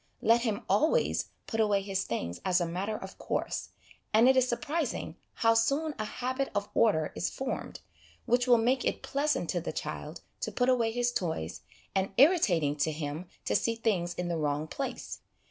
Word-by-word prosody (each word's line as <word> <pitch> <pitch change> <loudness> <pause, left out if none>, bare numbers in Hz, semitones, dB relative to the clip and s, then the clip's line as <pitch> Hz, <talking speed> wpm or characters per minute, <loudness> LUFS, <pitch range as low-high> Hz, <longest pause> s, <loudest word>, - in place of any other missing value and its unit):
Let 230 +2 +5
him 225 -1 -1
always 310 - +2 0.2
put 225 - -3
away 205 -2 +3
his 195 -1 -1
things 85 -7 -4
as 185 -1 +3
a 175 - +1
matter 190 +6 -2
of 190 0 -10
course, - - -2 0.4
and 225 +3 +6
it 265 - +6
is 255 -1 +3
surprising 275 +3 -2 0.2
how 225 0 +4
soon 280 +7 +1
a 215 - -1
habit 255 +4 -2
of 205 0 -1
order 160 -9 +3
is - - -1
formed, 265 0 -5 0.4
which 245 +1 +2
will 245 -1 +7
make 250 +3 +2
it - - -1
pleasant 290 +2 0
to - - -1
the - - -3
child - - -5 0.2
to - - -3
put 245 0 +1
away 235 -3 +3
his 245 +1 +1
toys, 160 - -3 0.3
and 190 0 0
irritating 195 - +4
to 150 +2 +1
him 155 +3 -4 0.2
to - - +1
see 230 - +1
things 190 -7 0
in 180 - -3
the 170 -1 -1
wrong 150 0 0
place. 270 - -5
225 Hz, 185 wpm, -30 LUFS, 175-250 Hz, 0.4 s, will